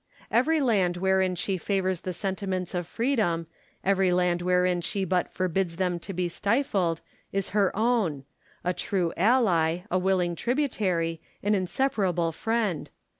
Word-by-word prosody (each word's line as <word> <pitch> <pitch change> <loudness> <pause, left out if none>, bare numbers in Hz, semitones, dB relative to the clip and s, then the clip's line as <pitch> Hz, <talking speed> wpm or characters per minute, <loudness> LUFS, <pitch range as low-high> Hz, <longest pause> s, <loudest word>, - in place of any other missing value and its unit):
Every 310 +7 +3
land 195 -9 +2
wherein 190 0 +2
she 185 +2 -1
favours 190 -2 0
the 185 - -3
sentiments 190 -1 -3
of 175 -2 -2
freedom, 215 -9 0 0.4
every 190 -1 +3
land 180 -1 +2
wherein 180 0 +2
she 195 +3 -1
but 180 0 0
forbids 185 -1 -1
them 180 -1 -1
to 195 - -7
be 180 -1 -1
stifled, 195 - 0 0.3
is 195 -1 -1
her 200 -2 +2
own; 215 - +1 0.4
a 180 - +1
true 180 -1 -1
ally, 180 -6 +3
a 185 - +2
willing 180 -2 +1
tributary, 190 - 0 0.2
an 205 +1 +2
inseparable 190 -4 0
friend. 215 -2 -1
185 Hz, 140 wpm, -27 LUFS, 175-205 Hz, 0.4 s, Every